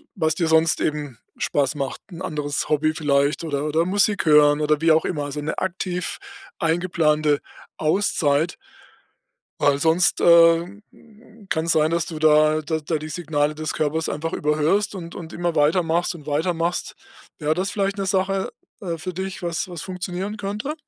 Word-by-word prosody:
was 160 Hz, -5 st, 0 dB
dir 165 Hz, -1 st, 0 dB
sonst 160 Hz, 0 st, +3 dB
eben 145 Hz, -5 st, -2 dB, 0.2 s
Spaß 145 Hz, 0 st, 0 dB
macht, 140 Hz, -2 st, -4 dB
'n 170 Hz, +2 st, -9 dB
anderes 150 Hz, -5 st, -3 dB
Hobby 155 Hz, +1 st, +2 dB
vielleicht 145 Hz, 0 st, +1 dB
oder 145 Hz, -3 st, -2 dB
oder 155 Hz, +2 st, +1 dB
Musik 200 Hz, +1 st, +1 dB
hören 150 Hz, 0 st, +5 dB
oder 150 Hz, 0 st, +2 dB
wie 165 Hz, 0 st, +4 dB
auch 160 Hz, -, +2 dB
immer, 150 Hz, -4 st, -2 dB
also 145 Hz, +1 st, -5 dB
'ne 150 Hz, -, -3 dB
aktiv 180 Hz, -1 st, -3 dB, 0.4 s
eingeplante 160 Hz, -3 st, +1 dB, 0.4 s
Auszeit. 155 Hz, -2 st, +1 dB, 1.0 s
Weil 145 Hz, -1 st, +3 dB
sonst, 165 Hz, +4 st, +2 dB
äh, 170 Hz, +3 st, +5 dB, 0.7 s
kann 160 Hz, 0 st, 0 dB
es 170 Hz, -, +1 dB
sein, 155 Hz, 0 st, +2 dB
dass 170 Hz, -1 st, 0 dB
du 160 Hz, -, -6 dB
da 155 Hz, 0 st, +4 dB
da 160 Hz, +1 st, -2 dB
da 155 Hz, +1 st, -2 dB
die 155 Hz, +1 st, -7 dB
Signale 150 Hz, -3 st, -1 dB
des 155 Hz, 0 st, -4 dB
Körpers 155 Hz, +1 st, -1 dB
einfach 165 Hz, +2 st, -3 dB
überhörst 155 Hz, +8 st, +1 dB
und 170 Hz, -2 st, -7 dB
und 165 Hz, -1 st, -8 dB
immer 175 Hz, -1 st, -2 dB
weitermachst 165 Hz, +3 st, +2 dB
und 150 Hz, -4 st, -12 dB
weitermachst. 165 Hz, +3 st, -1 dB, 0.4 s
Wäre 155 Hz, -1 st, 0 dB
das 185 Hz, +4 st, -2 dB
vielleicht 200 Hz, 0 st, -1 dB
'ne 195 Hz, -, -2 dB
Sache, 190 Hz, 0 st, 0 dB, 0.3 s
äh, 170 Hz, -4 st, -3 dB
für 180 Hz, +3 st, -6 dB
dich, 190 Hz, +1 st, -5 dB
was 170 Hz, +2 st, -2 dB
was 175 Hz, -3 st, -6 dB
funktionieren 185 Hz, +3 st, -5 dB
könnte? 210 Hz, +9 st, -4 dB
160 Hz, 165 wpm, -22 LUFS, 150-180 Hz, 1.0 s, hören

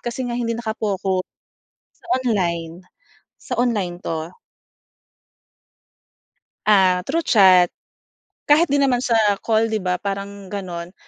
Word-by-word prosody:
kasi 240 Hz, +2 st, -4 dB
nga 245 Hz, -, -4 dB
hindi 230 Hz, -1 st, -2 dB
naka-focus 200 Hz, -5 st, -2 dB, 0.8 s
sa -, -, -19 dB, 0.2 s
online, 170 Hz, -7 st, -1 dB, 0.7 s
sa 250 Hz, -, -5 dB
online 210 Hz, -8 st, 0 dB
'to. 160 Hz, -2 st, -5 dB, 2.4 s
Ah, 185 Hz, -3 st, +4 dB
through 330 Hz, +4 st, 0 dB
chat. 185 Hz, -, +5 dB, 0.8 s
Kahit 310 Hz, +4 st, +4 dB
din 280 Hz, 0 st, +3 dB
naman 250 Hz, -2 st, +1 dB
sa 235 Hz, -3 st, +1 dB, 0.2 s
call 225 Hz, 0 st, +2 dB
'di 215 Hz, -, -1 dB
ba 180 Hz, 0 st, -1 dB
parang 200 Hz, 0 st, -6 dB
ganun. 175 Hz, -2 st, -6 dB
200 Hz, 115 wpm, -21 LUFS, 180-235 Hz, 2.4 s, chat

